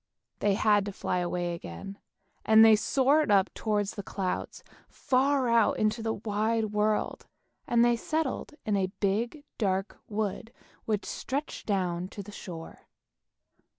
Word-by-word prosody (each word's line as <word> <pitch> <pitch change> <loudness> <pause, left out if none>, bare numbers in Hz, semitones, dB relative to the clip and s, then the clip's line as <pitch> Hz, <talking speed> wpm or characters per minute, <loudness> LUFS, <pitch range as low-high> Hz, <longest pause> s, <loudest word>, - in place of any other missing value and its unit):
They 205 -1 +2
had 210 -1 +3
to 205 - -4
fly 180 -1 -2
away 175 0 -2
again, 170 - -8 0.4
and 220 0 +7
they 220 -1 +8
soared 275 +6 +2
up 200 -1 +3
towards 205 -2 -1
the 200 - -6
clouds, 190 -1 -4 0.3
far 265 0 +1
out 230 -2 +3
into 215 +2 +1
the 225 0 -1
wide 215 +1 -1
world, 210 0 0 0.4
and 240 -2 +4
they 240 0 +4
settled 310 +2 -2
in 210 - +1
a 190 -1 0
big, 230 +9 -1 0.2
dark 195 -2 -1
wood, 215 +1 -3 0.3
which 210 -2 -1
stretched 280 +3 -4
down 180 -3 -1
to 200 +1 -8
the 205 - -11
shore. 165 -5 -9
210 Hz, 145 wpm, -29 LUFS, 195-230 Hz, 0.4 s, they